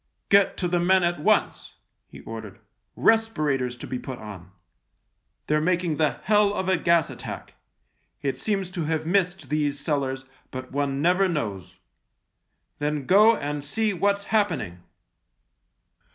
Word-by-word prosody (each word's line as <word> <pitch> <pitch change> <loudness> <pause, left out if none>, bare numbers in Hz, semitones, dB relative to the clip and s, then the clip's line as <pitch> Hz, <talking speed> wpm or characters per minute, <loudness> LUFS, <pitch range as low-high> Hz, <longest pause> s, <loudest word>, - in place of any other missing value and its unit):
" - - -51
Get 200 -1 +4
to 180 - -1
the 175 0 +1
men 185 +1 +3
THE 170 - +4
LIEUTENANT 175 -4 -7
49 - - +8
at - - -3
once! - - -17 0.2
" - - -52
he - - -11
ordered. 110 -3 -8 0.3
" - - -50 0.2
Respirators 150 - -1
to - - -8
be 125 - -4
put 130 -1 -7
on. 100 -5 -10 1.0
They're 150 0 +1
making 175 -2 0
the 155 -2 +2
hell 210 0 +3
of 190 - -2
a 190 - +3
gas 170 -1 +2
attack. - - -8 0.7
It 135 -1 -2
seems 195 -4 -2
to 175 -4 -3
have 160 0 -1
missed 180 -3 0
these 145 -1 0
cellars, 135 -3 -2 0.2
but 130 0 -7
one 140 0 -1
never 180 +3 +3
knows. 100 - -4 1.0
Then 150 -1 -2
go 215 - +6
and 145 0 -4
see 215 +8 0
what's 200 +2 +1
happening." 110 - 0
155 Hz, 165 wpm, -25 LUFS, 135-190 Hz, 1.0 s, 49